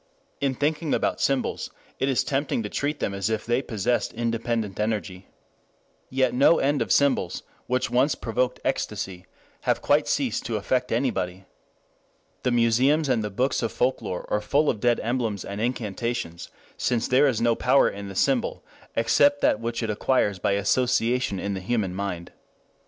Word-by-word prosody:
In 135 -2 0
thinking 150 +2 0
about - - -1
symbols 135 -2 0 0.3
it 135 - +1
is 130 - +2
tempting 135 -4 -1
to 105 - -4
treat 145 +5 -2
them 100 - -1
as 100 +1 -1
if 110 -1 -2
they 120 +2 +1
possessed 120 -1 -1
independent 115 -3 -2
energy. 100 -4 -2 0.8
Yet 130 -1 +1
no 140 +6 +5
end 145 +1 +1
of - - -1
symbols 140 -11 +2 0.2
which 125 +1 0
once 130 +3 +3
provoked 125 +2 -1
ecstasy 90 -1 -3 0.3
have - - 0
quite - - +3
ceased - - 0
to - - -2
affect 125 -1 -1
anybody. 95 -7 -1 1.0
The - - +1
museums 125 +6 +3
and 120 -4 +2
the 105 - -2
books 130 +7 0
of 115 - -1
folklore 120 -7 -1
are 105 - +1
full 145 +7 +2
of 110 - -7
dead 120 +2 +2
emblems 115 -4 -1
and 100 +1 -5
incantations, 115 -5 -3 0.3
since 120 -2 0
there 135 +3 +4
is 125 -5 +1
no 120 0 +3
power 130 +4 +4
in 100 0 -5
the 95 - -8
symbol, 130 +4 +1 0.3
except 145 +5 +3
that - - +3
which 115 +1 -3
it 110 - -1
acquires 105 -3 +1
by 100 - +1
association 120 +1 +1
in 100 +1 -2
the 95 - -4
human 100 -2 -1
mind. 90 -3 -4
120 Hz, 170 wpm, -25 LUFS, 105-130 Hz, 1.0 s, no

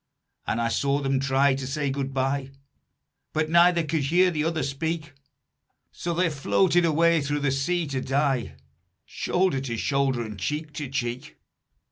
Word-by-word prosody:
And 115 - 0
I 115 0 +1
saw 140 +4 +1
them 135 -1 0
try 135 0 +3
to 135 -1 -4
say 140 0 -1
good 135 0 -3
bye, 135 0 -1 0.8
But 155 0 0
neither 170 0 +5
could 155 -2 -1
hear 180 +5 +4
the 155 -2 -1
other 160 -2 -1
speak; 155 +3 -3 0.8
So 170 -1 -4
they 180 +1 +2
floated 170 +5 +2
away 165 0 +3
through 145 +1 -2
the 140 -1 +1
sea 165 +6 0
to 135 -3 -3
die 135 -2 0 0.5
Shoulder 180 -7 0
to 120 -4 -4
shoulder 135 -2 0
and 105 -3 -8
cheek 150 - -3
to 145 -2 -5
cheek. 125 -2 -4
140 Hz, 160 wpm, -25 LUFS, 135-160 Hz, 0.8 s, neither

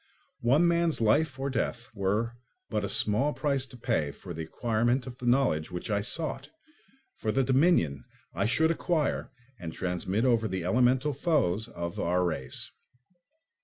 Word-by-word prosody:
One 140 +9 +4
man's 170 -1 +2
life 130 +6 +2
or 135 +1 -2
death 120 -1 -2
were 105 +4 -1 0.4
but - - 0
a - - -2
small 130 +8 +2
price 140 -3 0
to 125 - -13
pay 115 - 0
for 85 +5 -9
the 80 - -5
acquirement 120 +8 0
of 125 -1 -9
the 125 - -4
knowledge 120 - +2
which 90 +4 -5
I 100 0 +1
sought, 155 +9 -3 0.7
for 110 - -1
the 135 +4 +2
dominion 130 - +2 0.3
I 100 - 0
should 160 +7 +3
acquire 165 -2 0 0.3
and 85 -2 -5
transmit 95 +6 -1
over 115 -3 +3
the 95 -3 -3
elemental 125 +7 +3
foes 125 - +1
of 85 -6 -5
our 90 +1 +1
race. 75 -7 -3
120 Hz, 160 wpm, -29 LUFS, 95-135 Hz, 0.7 s, One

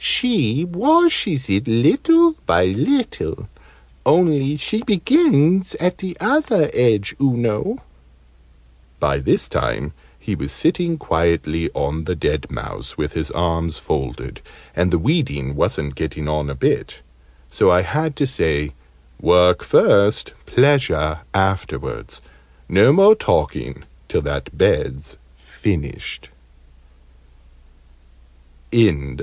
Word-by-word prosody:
She 160 - +1
washes 205 - +2
it 100 +2 -1
little 290 - +4 0.2
by 90 +1 +3
little 225 - -2 0.6
only 150 -4 +2
she 215 - 0
begins 190 - +2
at 180 +2 -2
the 185 -2 -6
other 250 - +1
edge, 110 -5 +1
oo 135 -3 +2
know." 115 -3 -2 1.2
By 70 -2 0
this 70 - +1
time 75 +2 -3 0.2
he - - -5
was 70 +1 -5
sitting 170 - 0
quietly 80 - -1
on 75 +3 -3
the 90 - -2
dead - - -2
mouse - - -8
with 75 -1 -3
his 80 -1 -3
arms 85 -1 -2
folded, 65 -2 -5 0.3
and 90 +2 +1
the 90 - +1
weeding 80 - -1
wasn't 70 0 -1
getting 75 +1 -5
on 75 -1 -2
a 70 - -5
bit: 65 - -2 0.5
so - - +3
I 90 +1 +4
had 155 +8 -2
to 145 - 0
say 75 - -1 0.5
"Work 90 0 +4
first, 100 +1 +3
pleasure 120 - +2
afterwards: 95 -1 -3 0.5
no 100 +8 +5
more 195 +7 +7
talking 220 - -2 0.2
till - - -1
that 70 -2 -5
bed's 70 +3 0 0.2
finished." 70 +4 -5
105 Hz, 110 wpm, -19 LUFS, -, 1.2 s, more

